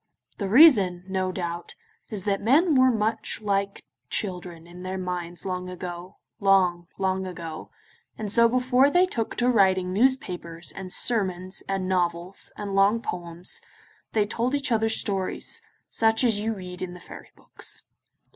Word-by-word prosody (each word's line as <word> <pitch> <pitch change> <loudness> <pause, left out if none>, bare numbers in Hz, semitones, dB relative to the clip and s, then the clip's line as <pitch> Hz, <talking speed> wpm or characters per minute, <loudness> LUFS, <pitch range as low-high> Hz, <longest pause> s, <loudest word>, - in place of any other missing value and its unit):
The 200 -2 -2
reason, 205 - +6
no 190 -1 -1
doubt, 175 -2 -5 0.3
is 205 -4 -4
that 195 -1 0
men 300 - +4
were 260 -1 +5
much 220 -1 -1
like 200 -1 -1 0.3
children 180 -4 -4
in 175 +1 -12
their 185 +1 -4
minds 175 -2 -5
long 180 -1 -3
ago, 180 0 -7 0.2
long, 185 -3 +3
long 190 -1 -1
ago, 165 -3 -7 0.5
and 210 -2 -3
so 235 +1 +6
before 255 +2 +3
they 355 +5 +4
took 230 -11 -3
to 245 - +1
writing 190 -6 +3
newspapers, 180 -8 0
and 190 -1 -8
sermons, 185 -5 0
and 195 -1 -1
novels, 175 0 -1
and 205 -1 -5
long 200 +3 +4
poems, 175 -4 -5 0.5
they 215 -2 +3
told 240 +5 -1
each 280 -2 -1
other 225 -1 +2
stories, 195 -4 0 0.3
such 225 +1 +2
as 225 -4 +3
you 220 +1 -1
read 180 -2 -9
in 180 -1 -5
the - - -11
fairy - - -12
books. - - -5
195 Hz, 155 wpm, -25 LUFS, 180-225 Hz, 0.5 s, reason